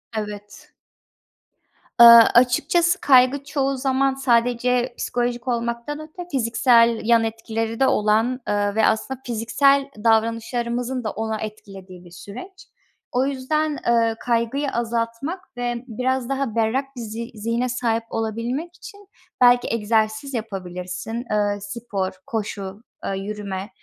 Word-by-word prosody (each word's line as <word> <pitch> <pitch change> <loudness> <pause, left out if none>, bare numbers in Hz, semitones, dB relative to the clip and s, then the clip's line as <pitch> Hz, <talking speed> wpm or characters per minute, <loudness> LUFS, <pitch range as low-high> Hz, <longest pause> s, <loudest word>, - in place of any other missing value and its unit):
Evet. 210 -1 -7 1.3
Iıı, 235 0 +11
açıkçası 335 +9 +3
kaygı 260 +1 +4
çoğu 275 -1 -1
zaman 270 +1 +1
sadece 245 -1 +1
psikolojik 245 0 -2
olmaktan 235 +4 -2
öte 315 +3 -9
fiziksel 230 -2 +3
yan 230 0 +4
etkileri 225 0 -3
de 270 - +4
olan, 220 +4 +2
ııı, 205 0 0
ve 220 -1 +3
aslında 250 +4 0
fiziksel 270 +4 +2 0.2
davranışlarımızın 235 +2 0
da 215 - -2
onu 220 0 -3
etkilediği 195 -4 -9
bir 175 - -15
süreç. 245 - -11 0.4
O 250 +2 +1
yüzden, 290 +3 -1
ııı, 230 -1 +3
kaygıyı 240 +4 0
azaltmak 235 +6 -3
ve 240 0 -3
biraz 255 +2 -2
daha 275 -4 -2
berrak 230 +4 +1
bir 245 - -6
zi 230 +1 -6
zihne 230 +4 -1
sahip 235 -2 -1
olabilmek 235 +10 -3
için 405 +1 -13 0.3
belki 245 0 +5
egzersiz 220 +4 0
yapabilirsin. 195 +1 -5
Iıı, 205 -1 0
spor, 200 -2 -4
koşu, 205 -2 -5 0.2
ııı, 195 - -2
yürüme 200 -1 -5
235 Hz, 120 wpm, -22 LUFS, 220-260 Hz, 1.3 s, Iıı